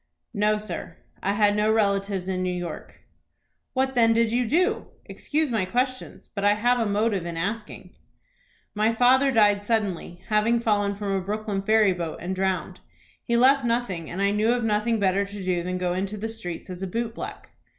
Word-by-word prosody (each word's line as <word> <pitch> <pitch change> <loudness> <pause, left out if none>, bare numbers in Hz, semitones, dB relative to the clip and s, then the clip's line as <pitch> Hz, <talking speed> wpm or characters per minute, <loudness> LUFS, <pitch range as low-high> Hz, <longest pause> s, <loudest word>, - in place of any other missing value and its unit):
"No, 210 0 +2
sir; 210 -4 -6 0.2
I 200 - 0
had 205 -1 +3
no 210 +1 +2
relatives 200 -3 0
in 185 -1 -1
New 185 - 0
York." 175 -1 -6 0.7
"What 265 0 0
then 230 -2 +4
did 230 -1 +2
you 245 0 +1
do? 365 - +1 0.2
Excuse 305 -2 -2
my 220 -4 +1
questions, 255 +6 -3
but 200 - -4
I 205 0 +4
have 245 +3 +2
a 225 - +1
motive 205 -3 0
in 170 -1 -5
asking." 210 +5 -5 0.8
"My 215 +2 +2
father 260 +3 +4
died 205 -3 +4
suddenly, 200 -5 -2
having 220 +2 +3
fallen 205 -3 +1
from 200 0 -3
a 195 - 0
Brooklyn 205 +1 -3
ferry 215 -1 +4
boat 170 -3 -4
and 180 +2 -3
drowned. 190 0 -2 0.4
He 235 -1 +1
left 265 +3 +5
nothing, 230 -9 -1
and 190 +3 -2
I 200 - +3
knew 215 +3 +2
of 245 -1 -1
nothing 225 +1 +1
better 195 0 +2
to 200 0 -7
do 180 -2 0
than 180 +1 -3
to - - -3
go 180 -1 0
into 195 +3 -3
the 220 +2 -4
streets 185 -5 -6
as 180 0 -7
a 190 - -2
boot 230 +4 -3
black." - - -8
210 Hz, 195 wpm, -25 LUFS, 190-230 Hz, 0.8 s, left